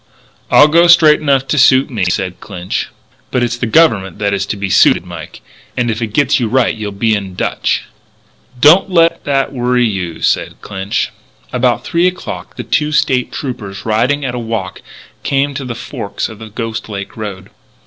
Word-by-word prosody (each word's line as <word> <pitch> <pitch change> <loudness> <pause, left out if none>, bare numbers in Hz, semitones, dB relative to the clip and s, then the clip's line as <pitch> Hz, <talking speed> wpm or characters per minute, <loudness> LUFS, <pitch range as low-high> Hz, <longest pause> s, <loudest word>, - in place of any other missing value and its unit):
"I 145 - +7
go 170 +3 +4
straight 165 -3 +6
enough 135 -3 +1
to 150 - +1
suit 130 +1 +4
me," 105 -6 -1
said 90 0 -2
Clinch. 90 +1 -4 0.4
"But 125 - 0
it's 120 0 -1
the 120 - -2
Government 110 -10 +3
that 100 -1 -1
is 100 0 -1
to 105 - -3
be 100 0 -3
suited, - - +4
Mike. - - -10 0.4
And 120 -1 +1
if 110 +2 -4
it 115 - -1
gets 140 +8 +1
you 120 - 0
right 125 +1 +2
you'll 105 -2 -5
be 110 +3 0
in 100 -3 -3
dutch." - - -1 0.8
"Don't 170 +9 +6
let 170 -2 +2
that 140 -1 0
worry 125 -1 +1
you," 95 -6 -4
said - - 0
Clinch. 95 0 -3 0.4
About 125 -1 +1
three 170 +2 +2
o'clock 180 0 -6
the 120 - -5
two 150 +7 0
State 130 -4 +1
Troopers, 105 -8 -6
riding 125 +6 +1
at 125 - -3
a 125 - -3
walk, 110 -5 -4 0.4
came 140 +1 0
to 140 0 -5
the 120 -2 -5
forks 115 -4 -5
of 110 - -11
the 110 -1 -9
Ghost 115 +1 -5
Lake 100 -2 -6
road. 100 -3 -7
120 Hz, 190 wpm, -15 LUFS, 105-140 Hz, 0.8 s, I